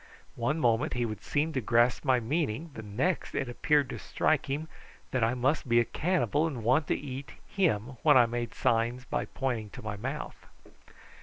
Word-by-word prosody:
One 130 +7 -1
moment 120 -4 +2
he 120 -1 0
would 110 -3 -5
seem 155 +2 -1
to 130 - 0
grasp 120 +2 +3
my 130 -1 +3
meaning, 145 +3 -2
the 110 - -7
next 120 - -1
it 135 - -1
appeared 145 +3 +2
to - - -5
strike - - 0
him 150 +4 -2 0.4
that 130 -3 +1
I 115 +3 +2
must 130 +2 0
be 120 0 +5
a 120 - +3
cannibal 155 - +1
and 130 -8 -5
want 130 +7 +3
to - - +2
eat 140 -1 -7
him 130 - 0
when 145 -3 +6
I 120 - +7
made 120 -1 -4
signs 120 +2 +1
by - - -2
pointing 120 -6 -3
to - - -10
my 105 -1 -4
mouth. 135 +8 -6
125 Hz, 190 wpm, -29 LUFS, 115-145 Hz, 0.4 s, I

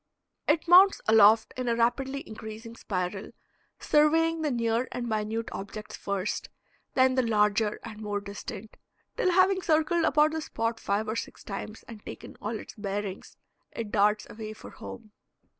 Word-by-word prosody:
It 315 +3 +2
mounts 370 +3 +7
aloft 220 0 +6
in 255 -1 -3
a 235 - +2
rapidly 265 +4 0
increasing 220 +1 -8
spiral, 190 -2 -4 0.4
surveying 325 +2 +3
the 305 - 0
near 235 0 0
and 245 -1 -4
minute 220 +1 -2
objects 200 +2 -7
first, 200 0 -3 0.5
then 260 0 +5
the 255 - +3
larger 210 -2 +2
and 220 -2 -8
more 205 -1 -2
distant, 200 +1 -8 0.4
till 425 -7 +2
having 375 +1 +4
circled 320 +1 +2
about 305 0 +4
the 320 0 -3
spot 230 -5 -2
five 205 +2 -1
or 220 - -2
six 230 - -6
times 210 +2 -7
and 220 -3 -11
taken - - -9
all 220 +2 -3
its - - -10
bearings 200 -2 -5 0.4
it 225 -3 -5
darts 210 0 +3
away 215 0 -7
for - - -12
home. 220 -3 -10
225 Hz, 160 wpm, -28 LUFS, 210-275 Hz, 0.5 s, mounts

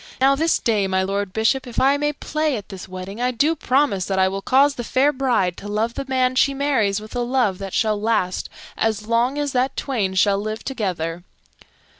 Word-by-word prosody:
Now 270 +1 +5
this 320 +4 +2
day, 210 -4 +1
my 190 0 +1
Lord 200 0 -2
Bishop, 225 +6 +1
if 240 - -4
I 275 +2 +4
may 295 +1 0
play 305 -1 -2
at 205 - -9
this 190 -2 -8
wedding, 185 +4 -7
I 250 - +2
do 285 +7 +1
promise 265 - +1
that 195 - -2
I 190 0 +4
will 195 +1 -4
cause 275 +6 +4
the 240 - -5
fair 275 +5 +2
bride 245 -10 +1
to 205 - -8
love 215 +3 -1
the 275 - -5
man 255 -1 +1
she 275 +2 +2
marries 260 -8 +1
with 215 +3 -11
a - - -1
love 240 -6 0
that 195 -1 -5
shall 215 -2 +1
last 210 -5 0 0.3
as 220 -1 -1
long 235 +5 +1
as 290 -1 -1
that 255 +1 0
twain 210 -9 -1
shall 195 +1 +3
live 215 +1 -4
together." 175 -9 -3
230 Hz, 215 wpm, -21 LUFS, 195-270 Hz, 0.3 s, Now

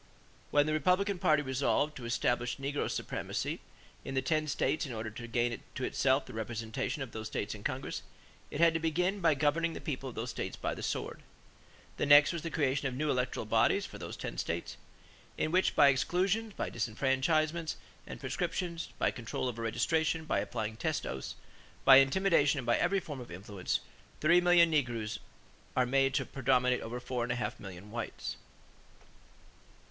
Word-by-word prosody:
When 145 0 +4
the 155 - 0
Republican 185 +4 +2
party 150 -3 +3
resolved 140 +3 +1
to 125 - -7
establish 120 +1 0
negro 140 +1 -2
supremacy - - -3 0.4
in 135 - -5
the 130 - +2
ten 155 +2 +1
states 150 +1 0
in 130 - -6
order 110 -1 -4
to 120 +2 -8
gain 120 0 0
to 130 - -4
itself 130 +2 +2
the - - -10
representation 115 +5 -3
of 125 - -9
those 110 0 -5
states 105 - -3
in 105 -1 -10
Congress, 135 -2 -3 0.5
it 145 - -5
had 165 -1 +6
to 165 - 0
begin 180 +5 0
by 160 -3 +4
governing 155 +4 +1
the - - -6
people 135 -2 -4
of 120 - -11
those 115 +1 -3
states - - -4
by - - -2
the - - -7
sword.... - - -3 0.8
The - - 0
next 145 +3 +8
was 170 - -3
the 165 - -4
creation 140 -3 0
of 130 - -4
new 150 +2 0
electoral 125 -1 -1
bodies - - +3
for - - -9
those - - -6
ten - - -5
states, - - -3 0.6
in 155 - 0
which, 185 +2 +2
by 145 - +7
exclusions, 185 - +1
by - - -3
disfranchisements 155 +7 0 0.3
and - - -7
proscriptions, 170 -3 -3
by - - +2
control 120 +1 -4
over 115 -2 -4
registration, 155 +8 0
by 125 - +1
applying 110 +2 -3
test - - -1
oaths... 65 - -5 0.5
by 135 -1 +10
intimidation 145 +1 +4
and 130 - -3
by 120 - +3
every 195 - +2
form 150 -6 -7
of 125 - -9
influence, 95 +1 -3 0.4
three 170 +3 +5
million 175 -2 +6
negroes 120 -8 0 0.6
are 130 - +4
made 135 +1 +2
to - - +1
predominate 125 -1 +2
over 120 +2 -5
four 125 0 -3
and 120 0 -1
a - - 0
half 110 -4 -3
million 95 +1 -10
whites." 120 0 -4
135 Hz, 185 wpm, -32 LUFS, 120-160 Hz, 0.8 s, by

